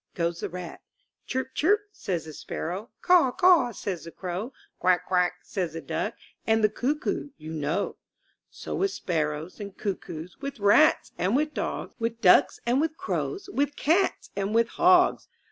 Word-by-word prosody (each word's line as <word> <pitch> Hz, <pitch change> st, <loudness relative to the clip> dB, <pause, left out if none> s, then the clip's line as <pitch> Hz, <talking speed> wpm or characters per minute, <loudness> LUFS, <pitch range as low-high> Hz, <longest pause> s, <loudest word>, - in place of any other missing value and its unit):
goes 170 Hz, -1 st, -1 dB
the -, -, -3 dB
rat. 180 Hz, -1 st, -7 dB, 0.5 s
"Chirp, 260 Hz, 0 st, -3 dB
chirp," 410 Hz, +7 st, +3 dB
says 185 Hz, -, -3 dB
the 155 Hz, -, -9 dB
sparrow, 185 Hz, -, -5 dB
"Caw, 350 Hz, -8 st, +5 dB
caw," 350 Hz, -9 st, +5 dB
says 185 Hz, -6 st, -4 dB
the -, -, -7 dB
crow, 185 Hz, +8 st, -5 dB, 0.3 s
"Quack, 180 Hz, -1 st, +2 dB
quack," 180 Hz, -1 st, +2 dB
says 180 Hz, -6 st, -3 dB
the 165 Hz, -, -5 dB
duck, -, -, -3 dB, 0.3 s
And 220 Hz, 0 st, +3 dB
the 215 Hz, -, +5 dB
cuckoo 285 Hz, +6 st, -2 dB
you 155 Hz, +1 st, -8 dB
know. 155 Hz, +5 st, -2 dB, 0.5 s
So -, -, -7 dB
with 390 Hz, -, +1 dB
sparrows 155 Hz, -, -3 dB
and 200 Hz, -2 st, -8 dB
cuckoos. 175 Hz, -4 st, -5 dB
With 275 Hz, -4 st, -5 dB
rats 205 Hz, +10 st, +4 dB
and 190 Hz, +6 st, +1 dB
with 300 Hz, +2 st, +1 dB
dogs. -, -, -3 dB
With 230 Hz, 0 st, -2 dB
ducks 185 Hz, -5 st, +5 dB
and 245 Hz, +4 st, +2 dB
with 320 Hz, 0 st, -1 dB
crows, 390 Hz, +1 st, -3 dB
With 285 Hz, +1 st, 0 dB
cats 340 Hz, +6 st, +1 dB
and 200 Hz, +2 st, -1 dB
with 230 Hz, 0 st, +3 dB
hogs! 360 Hz, 0 st, +4 dB
215 Hz, 165 wpm, -27 LUFS, 175-290 Hz, 0.5 s, Caw